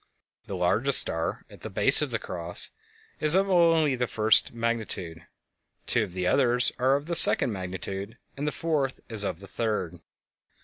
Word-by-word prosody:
The 100 - -6
largest 100 +10 +2
star, 80 0 -1
at - - -17
the - - -7
base - - +2
of - - -2
the - - -2
"Cross," 85 -1 -2 0.5
is 155 +2 +6
of 195 +1 +3
the 165 -9 +2
first 110 -1 +2
magnitude, 110 -8 -3 0.6
two - - 0
of 90 - -5
the 90 0 -4
others 125 +3 +2
are 130 +2 +2
of 140 +1 -4
the 170 - -4
second 160 - +5
magnitude, 95 +3 -7 0.2
and 145 +2 -5
the - - -1
fourth 150 -6 -3
is 110 -3 0
of 95 -2 -5
the 100 - -12
third. 100 -5 -4
115 Hz, 170 wpm, -26 LUFS, 95-140 Hz, 0.6 s, is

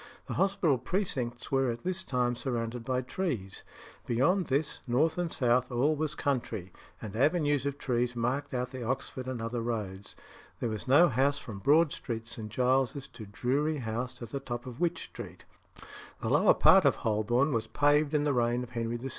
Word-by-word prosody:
The - - -5
hospital 190 - +2
precincts 125 - -2
were 135 -1 +2
at 115 0 -4
this 185 0 -1
time 125 -6 0
surrounded 120 -2 -3
by 130 +1 -1
trees. 125 - -3 0.4
Beyond 165 +10 +2
this, 140 +3 0
north 150 +8 +2
and 175 -2 -1
south, 125 0 +1
all 135 +6 +2
was 150 0 -2
country; 115 -9 -2 0.3
and 105 -1 -7
avenues 145 +1 +2
of 140 0 -3
trees 125 -2 -1
marked 130 +5 -1
out 125 0 -2
the 130 -2 -6
Oxford 130 +1 -3
and 130 -2 -3
other 115 +1 -3
roads. 105 -4 -4 0.4
There 120 - -1
was 110 +1 -5
no 145 +7 +7
house 135 +2 +2
from 110 -9 -7
Broad 150 +6 +4
Street, 115 -3 -4
St. 115 -2 -6
Giles's, 130 +3 +1
to 110 -4 -10
Drury 140 +9 0
House 120 0 -4
at 115 - -7
the 140 - -2
top 120 -3 -5
of 125 -1 -8
Wych 175 -1 +1
Street. - - -10 0.7
The - - -3
lower - - +5
part 190 -1 +7
of 140 - +4
Holborn 120 +6 +2
was 115 -1 -1
paved 145 +3 +2
in 145 - +2
the 145 -1 +1
reign 120 0 +1
of 125 - -10
Henry 115 -1 -2
VI. 130 +3 -5
125 Hz, 190 wpm, -30 LUFS, 120-145 Hz, 0.7 s, no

